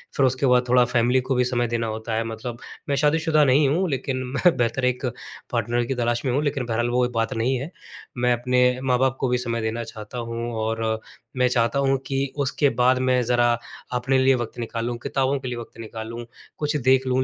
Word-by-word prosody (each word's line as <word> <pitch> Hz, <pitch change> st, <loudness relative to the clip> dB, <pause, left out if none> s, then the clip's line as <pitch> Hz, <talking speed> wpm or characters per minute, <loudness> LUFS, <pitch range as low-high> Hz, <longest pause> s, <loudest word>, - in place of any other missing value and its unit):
फिर 135 Hz, -, +3 dB
उसके 130 Hz, +2 st, +1 dB
बाद 125 Hz, -1 st, +3 dB
थोड़ा 125 Hz, 0 st, +6 dB
फैमिली 125 Hz, +1 st, +2 dB
को 130 Hz, +1 st, -1 dB
भी 125 Hz, -, +3 dB
समय 120 Hz, -1 st, 0 dB
देना 115 Hz, 0 st, -1 dB
होता 110 Hz, +1 st, -4 dB
है। 115 Hz, -, 0 dB
मतलब 115 Hz, +1 st, -6 dB, 0.3 s
मैं 140 Hz, -, +2 dB
शादी-शुदा 155 Hz, +1 st, +3 dB
नहीं 140 Hz, +2 st, +4 dB
हूँ 175 Hz, +4 st, +1 dB
लेकिन 135 Hz, -1 st, -2 dB, 0.2 s
मैं 175 Hz, +4 st, +4 dB
बेहतर 120 Hz, +2 st, 0 dB
एक 125 Hz, +1 st, 0 dB, 0.5 s
पार्टनर 120 Hz, 0 st, 0 dB
की 135 Hz, -, -2 dB
तलाश 120 Hz, 0 st, 0 dB
में 130 Hz, -, +1 dB
हूँ, 140 Hz, +4 st, +1 dB
लेकिन 140 Hz, -3 st, -1 dB
बहरहाल 120 Hz, +1 st, 0 dB
वो 125 Hz, 0 st, +2 dB
बात 115 Hz, 0 st, 0 dB
नहीं 120 Hz, +4 st, 0 dB
है। 150 Hz, +7 st, -6 dB, 0.5 s
मैं 125 Hz, 0 st, +2 dB
अपने 125 Hz, +1 st, +2 dB
माँ-बाप 130 Hz, 0 st, +1 dB
को 130 Hz, -, +1 dB
भी 125 Hz, -, +2 dB
समय 115 Hz, -2 st, -2 dB
देना 110 Hz, +1 st, -2 dB
चाहता 110 Hz, +1 st, -9 dB
हूँ। 115 Hz, 0 st, -4 dB
और 110 Hz, 0 st, -1 dB, 0.4 s
मैं 125 Hz, -, +4 dB
चाहता 120 Hz, +1 st, +1 dB
हूँ 135 Hz, 0 st, +2 dB
कि 135 Hz, 0 st, -1 dB
उसके 140 Hz, +1 st, +2 dB
बाद 125 Hz, +1 st, +4 dB
मैं 125 Hz, -1 st, +3 dB
ज़रा 120 Hz, 0 st, +3 dB, 0.4 s
अपने 130 Hz, +2 st, +1 dB
लिए 130 Hz, 0 st, +4 dB
वक़्त 120 Hz, -1 st, -5 dB
निकालूँ, 115 Hz, +1 st, -3 dB
किताबों 135 Hz, +1 st, 0 dB
के 130 Hz, -, -6 dB
लिए 120 Hz, -1 st, -4 dB
वक़्त 115 Hz, -1 st, -10 dB
निकालूँ, 115 Hz, +1 st, -7 dB, 0.3 s
कुछ 150 Hz, 0 st, -1 dB
देख 130 Hz, -1 st, +3 dB
लूँ। 130 Hz, 0 st, +2 dB
125 Hz, 210 wpm, -23 LUFS, 115-130 Hz, 0.5 s, थोड़ा